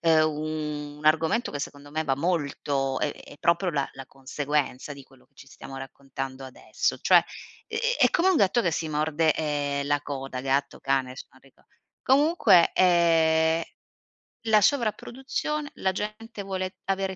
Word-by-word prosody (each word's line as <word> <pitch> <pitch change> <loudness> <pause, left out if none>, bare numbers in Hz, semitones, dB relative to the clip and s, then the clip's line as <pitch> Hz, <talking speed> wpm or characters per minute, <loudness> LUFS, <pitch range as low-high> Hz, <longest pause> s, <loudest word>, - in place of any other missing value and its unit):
uhm, 155 -2 0
un 150 - -14
argomento 160 +9 +2
che, 145 - -5
secondo 145 0 -7
me, 155 +2 -2
va 135 -3 0
molto, 140 -4 -1
è 150 - -1
è - - -14
proprio 170 +2 +2
la 140 -3 -1
la 135 -1 -10
conseguenza 140 +1 -3
di 140 - -12
quello 130 -1 -22
che - - -45
ci - - -15
stiamo 135 0 -11
raccontando 135 0 -7
adesso. 130 - -2
Cioè, - - +5 0.4
ehm, 455 0 -4 0.2
è - - +6
come 365 +2 +2
un 370 - +3
gatto 205 0 +3
che 170 - +1
si 160 0 -2
morde, 155 +1 +1
ehm, 145 -2 -2
la 145 0 +1
coda, 135 -3 -5
gatto, 135 +1 -1
cane, 135 -1 0
adesso 130 - -9
non 130 - -22
rico 135 -1 -24 0.4
comunque, 265 - +4
ehm, 165 -2 +3 0.9
la 215 -1 +5
sovraproduzione, 270 +5 -1
la 190 - 0
gente 215 +3 -6
vuole 185 -1 -4
avere 195 0 -1
155 Hz, 160 wpm, -26 LUFS, 140-190 Hz, 0.9 s, è